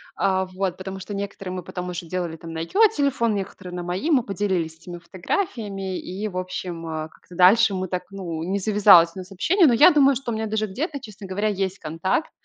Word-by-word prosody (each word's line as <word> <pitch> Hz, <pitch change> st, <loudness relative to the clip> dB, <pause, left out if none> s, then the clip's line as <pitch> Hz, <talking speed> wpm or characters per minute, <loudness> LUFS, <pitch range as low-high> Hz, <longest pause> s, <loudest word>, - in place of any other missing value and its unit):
А, 190 Hz, -1 st, +1 dB
вот, 185 Hz, -1 st, -3 dB
потому 190 Hz, 0 st, -6 dB
что 200 Hz, +2 st, -7 dB
некоторые 195 Hz, -2 st, -5 dB
мы 180 Hz, -1 st, -5 dB
потом 180 Hz, 0 st, -6 dB
уже 175 Hz, 0 st, -5 dB
делали 170 Hz, -2 st, -3 dB
на 165 Hz, -1 st, -6 dB
её 405 Hz, -, +4 dB
телефон, 255 Hz, -6 st, +1 dB
некоторые 190 Hz, -2 st, -6 dB
на 175 Hz, -, -4 dB
мои, 180 Hz, -, -2 dB
мы 275 Hz, -7 st, +4 dB
поделились 190 Hz, -6 st, -2 dB
этими 175 Hz, +2 st, -9 dB
фотографиями 195 Hz, -, -3 dB
и, 195 Hz, +4 st, -5 dB
в 185 Hz, -3 st, -6 dB
общем, 180 Hz, -2 st, -5 dB
э, 155 Hz, 0 st, -4 dB
как-то 175 Hz, -, -17 dB
дальше 200 Hz, +5 st, +6 dB
мы 185 Hz, 0 st, -2 dB
так 180 Hz, 0 st, -3 dB
ну, 170 Hz, -5 st, -5 dB
не 190 Hz, +4 st, -1 dB
завязалось 200 Hz, -5 st, +6 dB
у -, -, -6 dB
нас 185 Hz, +1 st, -10 dB
общение. 335 Hz, -, +3 dB
Но 250 Hz, -, +4 dB
я 300 Hz, +10 st, +7 dB
думаю, 280 Hz, -2 st, +5 dB
что 255 Hz, -1 st, -4 dB
у -, -, -2 dB
меня 220 Hz, 0 st, -2 dB
даже 215 Hz, 0 st, -1 dB
где-то, 280 Hz, -, -4 dB
честно 210 Hz, -4 st, -10 dB
говоря, 200 Hz, +3 st, -1 dB
есть 195 Hz, -1 st, -2 dB
контакт. 165 Hz, -, -2 dB
190 Hz, 215 wpm, -23 LUFS, 180-215 Hz, -, я